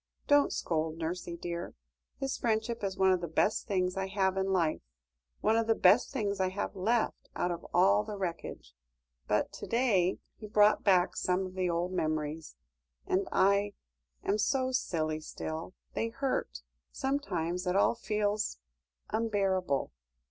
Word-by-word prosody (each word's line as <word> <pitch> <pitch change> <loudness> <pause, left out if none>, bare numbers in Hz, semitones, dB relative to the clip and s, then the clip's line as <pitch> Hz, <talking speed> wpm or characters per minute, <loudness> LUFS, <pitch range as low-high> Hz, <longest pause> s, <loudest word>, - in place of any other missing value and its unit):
Don't 290 0 +4
scold, 160 -1 -1
nursie 170 +1 -4
dear; 170 0 -5 0.4
his 270 -1 -2
friendship 225 0 -1
is 190 -1 -2
one 190 0 +4
of 185 -1 +2
the 170 - -3
best 185 +6 +1
things 185 -3 0
I 190 0 -2
have 190 -1 +1
in 190 0 0
life 175 -5 +1 0.6
one 220 +1 +3
of 225 0 +1
the 225 - +4
best 200 +6 +5
things 205 -7 -1
I 185 -1 +2
have 200 +2 -4
left 220 +5 0
out 175 - 0
of 170 - -5
all 105 - +4
the 205 - -6
wreckage; 170 - -5 0.5
but - - +1
to - - -7
day 215 -7 +2 0.2
he 215 - -8
brought 210 0 +4
back 185 -3 +4
some 185 +1 0
of 185 - -8
the 185 -1 0
old 170 +2 -1
memories, 155 - -2 0.5
and 190 +1 0
I 200 +1 +3 0.5
am 205 +2 +1
so 260 +4 +1
silly 155 -10 -1
still. 160 +3 -6 0.2
They 225 - -1
hurt; 255 - -2 0.3
sometimes 180 - -2
it 180 - +1
all 200 - +4
feels 210 - -1 0.5
unbearable." 195 -9 0
190 Hz, 155 wpm, -31 LUFS, 175-215 Hz, 0.6 s, best